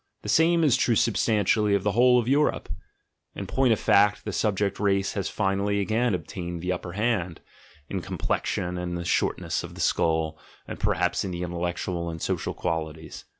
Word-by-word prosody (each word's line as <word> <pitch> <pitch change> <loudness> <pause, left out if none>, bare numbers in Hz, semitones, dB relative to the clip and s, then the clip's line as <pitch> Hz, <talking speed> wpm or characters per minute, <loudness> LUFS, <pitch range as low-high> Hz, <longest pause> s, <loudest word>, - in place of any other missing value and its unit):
(The - - -5
same 165 +1 +4
is 135 -5 +4
true 120 -2 +2
substantially 105 -1 +2
of 100 - -1
the 105 - +1
whole 125 +3 +5
of 120 -2 0
Europe: 145 +3 +1 0.7
in 100 - -5
point 130 +5 +2
of 110 - +2
fact, 100 +1 +3
the - - -4
subject 100 -2 0
race 100 -1 +1
has 100 -3 -2
finally 100 0 0
again 110 +2 +1
obtained 85 +1 -6
the 90 - -1
upper 90 -1 -4
hand, 100 -5 -1 0.5
in - - -3
complexion 90 0 -2
and 90 0 -3
the 85 - -5
shortness 85 - 0
of - - -9
the - - -11
skull, 80 -1 +1 0.3
and - - -7
perhaps - - +1
in 95 - -3
the 90 -1 -4
intellectual 85 0 -3
and 80 -1 -6
social - - -2
qualities. 80 -2 -4
95 Hz, 180 wpm, -26 LUFS, 85-110 Hz, 0.7 s, whole